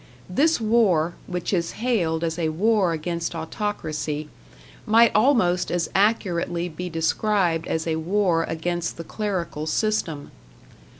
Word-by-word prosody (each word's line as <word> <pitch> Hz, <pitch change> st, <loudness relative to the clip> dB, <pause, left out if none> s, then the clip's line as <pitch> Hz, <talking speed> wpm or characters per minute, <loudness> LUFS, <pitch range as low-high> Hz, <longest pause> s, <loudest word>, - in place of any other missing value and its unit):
This 295 Hz, -, +2 dB
war, 210 Hz, -8 st, +2 dB
which 180 Hz, +2 st, -3 dB
is 170 Hz, -2 st, 0 dB
hailed 180 Hz, -9 st, 0 dB
as 165 Hz, 0 st, -2 dB
a 160 Hz, -2 st, +1 dB
war 195 Hz, +2 st, +2 dB
against 170 Hz, +1 st, -3 dB
autocracy, 155 Hz, -4 st, -3 dB, 0.6 s
might 230 Hz, +2 st, +6 dB
almost 215 Hz, -7 st, +3 dB
as 175 Hz, -2 st, -1 dB
accurately 180 Hz, -4 st, +1 dB
be 180 Hz, +2 st, -6 dB
described 165 Hz, +1 st, 0 dB
as 160 Hz, 0 st, -1 dB
a 160 Hz, -1 st, 0 dB
war 175 Hz, 0 st, +1 dB
against 170 Hz, +1 st, -3 dB
the 165 Hz, -, -6 dB
clerical 170 Hz, -6 st, -3 dB
system. 165 Hz, -6 st, -1 dB
175 Hz, 125 wpm, -24 LUFS, 165-210 Hz, 0.6 s, might